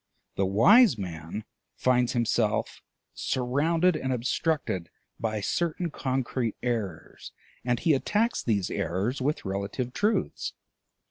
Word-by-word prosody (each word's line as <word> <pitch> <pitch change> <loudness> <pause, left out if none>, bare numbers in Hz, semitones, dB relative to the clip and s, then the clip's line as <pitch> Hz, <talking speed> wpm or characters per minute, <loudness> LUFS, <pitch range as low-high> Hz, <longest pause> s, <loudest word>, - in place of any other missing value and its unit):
The 95 - 0
wise 185 - +6
man 85 +2 -6 0.3
finds 125 -1 +2
himself 120 -2 0 0.3
surrounded 155 +8 +1
and 130 -3 -2
obstructed 125 - -1 0.3
by 110 -2 -2
certain 170 - -1
concrete 130 -4 -2
errors, 105 -10 -4 0.3
and 120 -1 0
he 160 - +3
attacks 215 - +1
these 100 -6 0
errors 100 - -1
with 145 0 -1
relative 100 +6 -3
truths. 210 +2 0
125 Hz, 110 wpm, -27 LUFS, 100-150 Hz, 0.3 s, wise